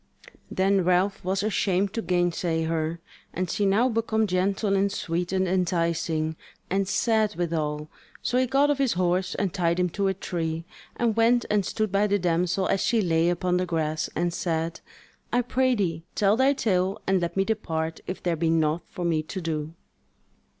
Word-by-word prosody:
Then 195 Hz, 0 st, +2 dB
Ralph 185 Hz, +3 st, +1 dB
was 190 Hz, +2 st, 0 dB
ashamed 195 Hz, -2 st, +1 dB
to 230 Hz, -, -2 dB
gainsay 175 Hz, -3 st, 0 dB
her, 160 Hz, 0 st, -1 dB, 0.4 s
and 185 Hz, +1 st, -1 dB
she 205 Hz, -, +1 dB
now 215 Hz, +6 st, +3 dB
become 225 Hz, -2 st, +1 dB
gentle 195 Hz, +2 st, +1 dB
and 195 Hz, +1 st, +2 dB
sweet 175 Hz, -1 st, -2 dB
and 190 Hz, -1 st, +1 dB
enticing, 170 Hz, -3 st, 0 dB, 0.3 s
and 195 Hz, 0 st, +1 dB
sad 220 Hz, 0 st, +1 dB
withal; 155 Hz, -3 st, -2 dB, 0.4 s
so 250 Hz, -, +1 dB
he 255 Hz, -, +2 dB
got 275 Hz, +3 st, +3 dB
off 285 Hz, -, -1 dB
his 270 Hz, -3 st, +2 dB
horse 180 Hz, +1 st, 0 dB
and 195 Hz, -4 st, -1 dB
tied 175 Hz, -2 st, +1 dB
him 180 Hz, 0 st, +2 dB
to 200 Hz, +3 st, -1 dB
a 190 Hz, -, 0 dB
tree, 165 Hz, -3 st, -3 dB, 0.3 s
and 230 Hz, -3 st, +1 dB
went 235 Hz, +1 st, +3 dB
and 210 Hz, -1 st, +3 dB
stood 215 Hz, -3 st, -1 dB
by 200 Hz, +1 st, +2 dB
the 205 Hz, 0 st, +2 dB
damsel 180 Hz, +1 st, +1 dB
as 195 Hz, -, +1 dB
she 235 Hz, -, +2 dB
lay 170 Hz, -3 st, +2 dB
upon 180 Hz, +1 st, 0 dB
the 180 Hz, 0 st, -1 dB
grass, 155 Hz, -2 st, -1 dB
and 175 Hz, +1 st, 0 dB
said: 165 Hz, -1 st, -2 dB, 0.5 s
"I 245 Hz, 0 st, +2 dB
prithee 240 Hz, -10 st, +1 dB
tell 205 Hz, 0 st, +3 dB
thy 265 Hz, +3 st, +4 dB
tale 190 Hz, -7 st, 0 dB
and 190 Hz, -1 st, +2 dB
let 170 Hz, +2 st, -3 dB
me 195 Hz, -, +3 dB
depart 165 Hz, -7 st, -2 dB
if 185 Hz, -, -5 dB
there 175 Hz, -2 st, +1 dB
be 165 Hz, +1 st, 0 dB
naught 160 Hz, 0 st, +2 dB
for 180 Hz, -4 st, -5 dB
me 165 Hz, -2 st, +1 dB
to 160 Hz, +5 st, -6 dB
do." 160 Hz, -2 st, -3 dB
185 Hz, 185 wpm, -26 LUFS, 165-205 Hz, 0.5 s, thy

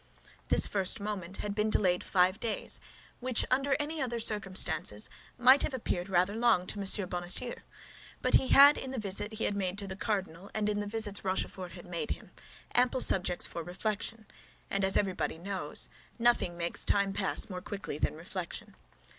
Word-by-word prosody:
This -, -, +6 dB
first 195 Hz, -3 st, +1 dB
moment 195 Hz, -3 st, -5 dB
had 205 Hz, -, -3 dB
been 210 Hz, +1 st, 0 dB
delayed 180 Hz, -4 st, +2 dB
five 185 Hz, +2 st, +2 dB
days, 230 Hz, -3 st, -2 dB, 0.4 s
which, 250 Hz, -2 st, +1 dB
under 275 Hz, +2 st, +2 dB
any 305 Hz, +1 st, -3 dB
other 240 Hz, -3 st, -2 dB
circumstances, 190 Hz, -, 0 dB, 0.3 s
might 255 Hz, +3 st, +6 dB
have 275 Hz, -, -1 dB
appeared 185 Hz, -6 st, -3 dB
rather 185 Hz, +2 st, +2 dB
long 225 Hz, -6 st, +3 dB
to 205 Hz, -, -2 dB
M. 195 Hz, 0 st, +5 dB
Bonacieux; 180 Hz, +7 st, 0 dB, 0.7 s
but -, -, -1 dB
he 260 Hz, -, +5 dB
had, 285 Hz, +2 st, +7 dB
in 265 Hz, -, -6 dB
the 265 Hz, -, -5 dB
visit 205 Hz, 0 st, -2 dB
he 220 Hz, -, -3 dB
had 205 Hz, -, 0 dB
made 190 Hz, -1 st, -2 dB
to 200 Hz, -, -4 dB
the 190 Hz, -1 st, -6 dB
cardinal 195 Hz, -3 st, -3 dB
and 210 Hz, -1 st, 0 dB
in 205 Hz, 0 st, -1 dB
the 205 Hz, -, -3 dB
visits 210 Hz, -1 st, -1 dB
Rochefort 185 Hz, -2 st, -3 dB
had 175 Hz, -, -11 dB
made 175 Hz, +5 st, -4 dB
him, -, -, -6 dB, 0.4 s
ample 250 Hz, +1 st, +2 dB
subjects 180 Hz, -2 st, +5 dB
for 170 Hz, -, -6 dB
reflection, 215 Hz, +5 st, -4 dB, 0.5 s
and 195 Hz, 0 st, 0 dB
as 190 Hz, 0 st, +3 dB
everybody 190 Hz, -4 st, -1 dB
knows, 180 Hz, -4 st, 0 dB, 0.3 s
nothing 235 Hz, -7 st, +2 dB
makes 170 Hz, 0 st, -2 dB
time 200 Hz, -1 st, +1 dB
pass 195 Hz, +2 st, 0 dB
more 185 Hz, -3 st, -7 dB
quickly 200 Hz, +2 st, -6 dB
than -, -, -1 dB
reflection. -, -, -7 dB
200 Hz, 180 wpm, -30 LUFS, 185-225 Hz, 0.7 s, had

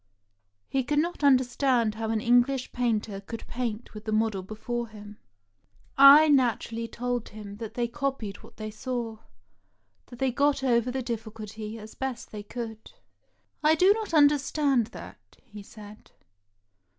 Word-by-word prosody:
" 105 Hz, -, -49 dB, 0.2 s
He 270 Hz, -1 st, 0 dB
could 295 Hz, +4 st, -1 dB
not 335 Hz, +1 st, -1 dB
understand 255 Hz, -3 st, +3 dB
how 220 Hz, 0 st, -4 dB
an 225 Hz, -1 st, 0 dB
English 245 Hz, +3 st, +2 dB
painter 220 Hz, -5 st, -1 dB
could 225 Hz, +3 st, -8 dB
paint 235 Hz, -2 st, -4 dB
with 210 Hz, 0 st, -10 dB
the 215 Hz, -, -2 dB
model 215 Hz, -2 st, +1 dB
before 230 Hz, +4 st, -4 dB
him. 210 Hz, -1 st, -12 dB, 0.8 s
I 280 Hz, +3 st, +9 dB
naturally 235 Hz, -4 st, +1 dB
told 245 Hz, 0 st, -3 dB
him 205 Hz, -1 st, -9 dB
that 225 Hz, 0 st, -7 dB
they 240 Hz, -1 st, 0 dB
copied 250 Hz, -6 st, -3 dB
what -, -, -17 dB
they 215 Hz, 0 st, -6 dB
saw; 230 Hz, 0 st, -4 dB, 0.9 s
that 245 Hz, -, -12 dB
they 265 Hz, +1 st, +1 dB
got 280 Hz, +2 st, +1 dB
over 240 Hz, -2 st, +2 dB
the 260 Hz, +1 st, -3 dB
dijB&culty 220 Hz, -1 st, -6 dB
as 220 Hz, 0 st, -11 dB
best 265 Hz, -3 st, -5 dB
they 210 Hz, -, -6 dB
could. 220 Hz, -, -8 dB, 0.7 s
"I 310 Hz, +1 st, +4 dB
do 370 Hz, +5 st, +5 dB
not 440 Hz, -2 st, -5 dB
understand 285 Hz, -4 st, +3 dB
that," -, -, -13 dB
he 210 Hz, -4 st, -11 dB
said. 210 Hz, +1 st, -13 dB
235 Hz, 150 wpm, -27 LUFS, 215-265 Hz, 0.9 s, I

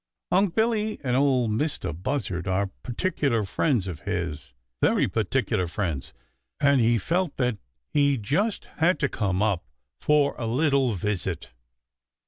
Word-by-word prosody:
Unc' 185 Hz, -1 st, +3 dB
Billy 220 Hz, -1 st, +1 dB
and 125 Hz, -2 st, +1 dB
Ol' 130 Hz, -3 st, +3 dB
Mistah 110 Hz, -, -1 dB
Buzzard 95 Hz, -, -3 dB
are 95 Hz, +1 st, 0 dB
particular 130 Hz, -3 st, 0 dB
friends 110 Hz, -, +1 dB
of 90 Hz, -5 st, -5 dB
his, 75 Hz, -8 st, -4 dB, 0.3 s
very -, -, +3 dB
particular 110 Hz, -3 st, 0 dB
friends, 85 Hz, -6 st, -3 dB, 0.5 s
and 140 Hz, -3 st, +4 dB
he 115 Hz, +1 st, +4 dB
felt 170 Hz, -, -1 dB
that 125 Hz, -5 st, 0 dB, 0.3 s
he 140 Hz, -2 st, +3 dB
just 160 Hz, -, 0 dB
had 170 Hz, +1 st, +3 dB
to 140 Hz, -, +1 dB
come 100 Hz, -6 st, 0 dB
up 100 Hz, -5 st, +1 dB, 0.4 s
for 150 Hz, -1 st, +3 dB
a 115 Hz, -, -2 dB
little 135 Hz, -1 st, +2 dB
visit. 100 Hz, 0 st, -3 dB
120 Hz, 135 wpm, -26 LUFS, 95-145 Hz, 0.5 s, and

